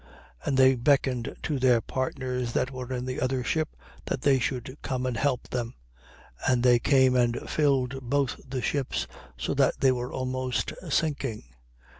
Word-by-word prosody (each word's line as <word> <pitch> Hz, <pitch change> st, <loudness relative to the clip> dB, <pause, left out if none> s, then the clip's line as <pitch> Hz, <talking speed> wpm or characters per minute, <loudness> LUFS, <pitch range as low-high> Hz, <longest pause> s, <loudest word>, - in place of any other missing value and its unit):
5:7. -, -, -12 dB
And 135 Hz, -, +1 dB
they 130 Hz, 0 st, +7 dB
beckoned 130 Hz, -1 st, +1 dB
to 145 Hz, -3 st, -1 dB
their 125 Hz, -2 st, +5 dB
partners 125 Hz, -1 st, -3 dB
that 130 Hz, -, 0 dB
were 130 Hz, -1 st, -6 dB
in 125 Hz, -1 st, -2 dB
the 130 Hz, 0 st, -3 dB
other 130 Hz, 0 st, 0 dB
ship, 155 Hz, +4 st, -1 dB, 0.3 s
that 130 Hz, -, -2 dB
they 135 Hz, -2 st, +4 dB
should 130 Hz, +1 st, -3 dB
come 130 Hz, -2 st, -2 dB
and 125 Hz, -2 st, -1 dB
help 130 Hz, +1 st, 0 dB
them. 120 Hz, -1 st, -3 dB, 0.7 s
And 125 Hz, -2 st, +3 dB
they 120 Hz, -1 st, +6 dB
came 130 Hz, 0 st, +4 dB
and 120 Hz, -1 st, +1 dB
filled 135 Hz, -3 st, +1 dB
both 140 Hz, -1 st, 0 dB
the 130 Hz, -1 st, -3 dB
ships, 125 Hz, -, -1 dB, 0.3 s
so -, -, -2 dB
that -, -, +2 dB
they 135 Hz, -, +5 dB
were 125 Hz, 0 st, -3 dB
almost 130 Hz, 0 st, -2 dB, 0.2 s
sinking. 140 Hz, -7 st, -1 dB
130 Hz, 170 wpm, -27 LUFS, 125-135 Hz, 0.7 s, they